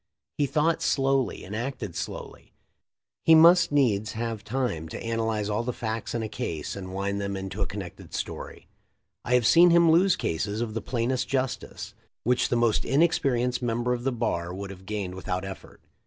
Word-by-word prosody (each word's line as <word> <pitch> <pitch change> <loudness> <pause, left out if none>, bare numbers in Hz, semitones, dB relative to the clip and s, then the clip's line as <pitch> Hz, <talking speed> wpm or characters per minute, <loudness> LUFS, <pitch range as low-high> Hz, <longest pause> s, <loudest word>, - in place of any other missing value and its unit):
He 145 - +3
thought 160 +3 +1
slowly 135 -1 +1
and 100 - -6
acted 115 -6 -4
slowly; - - -7 0.7
he 165 - +7
must 170 +2 +7
needs 110 -8 +2
have 115 -2 -4
time 105 -10 -2
to - - -6
analyze 110 -2 -1
all 105 +1 0
the 120 +1 -2
facts 110 0 -4
in 115 - -1
a - - -2
case 80 -6 -4
and 95 -2 -7
wind 100 +1 -2
them 100 0 -3
into 95 +2 -5
a 100 - +1
connected 95 -2 -8
story. - - -6 0.6
I 125 - +2
have 125 -2 +3
seen 170 +9 +7
him 170 -1 +6
lose 180 +3 +5
cases 100 +6 -2
of 115 -2 -2
the 115 - -3
plainest 125 +1 -1
justice, 130 -6 -3 0.3
which 125 +1 +2
the - - +1
most 120 -2 +2
inexperienced 130 -5 +2
member 120 +1 0
of 120 -1 -4
the 135 - +1
bar 110 -8 -2
would 100 +1 -6
have 95 0 -13
gained 100 -4 -3
without 90 0 -3
effort. 95 0 -10
115 Hz, 185 wpm, -26 LUFS, 100-130 Hz, 0.7 s, he